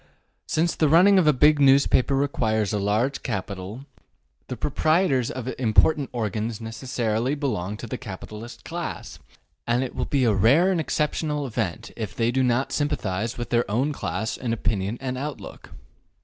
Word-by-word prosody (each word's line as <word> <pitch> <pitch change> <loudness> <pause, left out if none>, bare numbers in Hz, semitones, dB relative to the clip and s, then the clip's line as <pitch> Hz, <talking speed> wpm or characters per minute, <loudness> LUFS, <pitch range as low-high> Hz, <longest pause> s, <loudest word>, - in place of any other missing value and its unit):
Since 160 +1 +1
the 155 - +2
running 185 +5 +6
of 170 - +2
a - - +8
big 150 +2 +4
newspaper 135 -1 +4
requires 110 -7 0
a 105 - 0
large 110 +7 0
capital, 100 +2 -5 0.6
the - - -5
proprietors 155 -6 +1
of 130 0 -4
important 130 +4 +3
organs 110 -1 -3
necessarily 115 +1 -2
belong 105 -9 -3
to 120 - -7
the 120 +2 -5
capitalist 115 +2 -9
class, 170 +1 -6 0.5
and 120 +2 +2
it 130 - -5
will - - -2
be 140 -2 +1
a 115 -3 +3
rare 135 - +4
and 175 -3 +1
exceptional 150 -1 -1
event 110 -3 -3
if 110 -4 -5
they 115 0 +1
do 130 +2 +1
not 125 +1 +1
sympathize 110 -7 -2
with 120 - -5
their 120 -2 +1
own 130 +8 0
class 110 -5 -3
in 120 -3 -2
opinion 105 -1 -1
and 130 -1 -4
outlook. 145 0 -7
125 Hz, 165 wpm, -24 LUFS, 110-145 Hz, 0.6 s, a